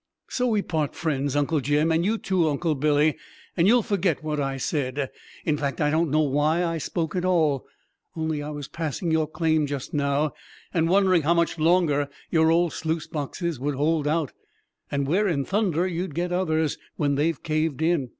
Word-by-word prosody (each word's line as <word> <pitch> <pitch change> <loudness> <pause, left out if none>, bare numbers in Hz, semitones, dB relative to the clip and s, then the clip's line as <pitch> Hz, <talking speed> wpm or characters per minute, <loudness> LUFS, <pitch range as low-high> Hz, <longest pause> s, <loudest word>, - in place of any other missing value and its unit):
So 250 0 0
we 215 -4 +1
part 155 -4 -2
friends, 145 -4 -1
Uncle 145 +2 +1
Jim, 145 +4 +1
and 160 +1 +2
you 215 +4 +1
too, 185 -6 +1
Uncle 155 +2 0
Billy, 150 +1 +2 0.4
and 170 0 +3
you'll 240 +2 +5
forget 180 -8 0
what 150 -1 -2
I 135 -1 -1
said. 135 -1 -2 0.3
In 150 -2 +1
fact, 140 -4 -2
I 150 0 +2
don't 160 +1 +2
know 155 +2 +3
why 150 +5 +1
I 165 -1 -1
spoke 160 +2 -3
at 180 - 0
all 160 -7 +1 0.5
only 160 -2 -2
I 145 - -5
was 145 -2 -6
passing 165 +1 -3
your 160 -1 +2
claim 155 -1 +1
just 140 -2 -5
now, 145 0 +1 0.4
and 165 -1 +2
wondering 185 -2 +4
how 165 +4 +2
much 170 -1 +1
longer 155 -4 +3 0.2
your 160 -1 +4
old 170 0 +2
sluice 160 -1 -2
boxes 160 0 -4
would 145 +2 -1
hold 150 +2 +1
out, 155 -2 0 0.6
and 140 -1 -1
where 190 +9 +2
in 140 -7 0
thunder 190 -5 +1
you'd 175 -3 -3
get 175 +1 -1
others 160 -4 0 0.2
when 145 -2 +1
they 150 +4 +2
caved 155 0 -1
in! 160 -6 +1
155 Hz, 190 wpm, -25 LUFS, 145-170 Hz, 0.6 s, you'll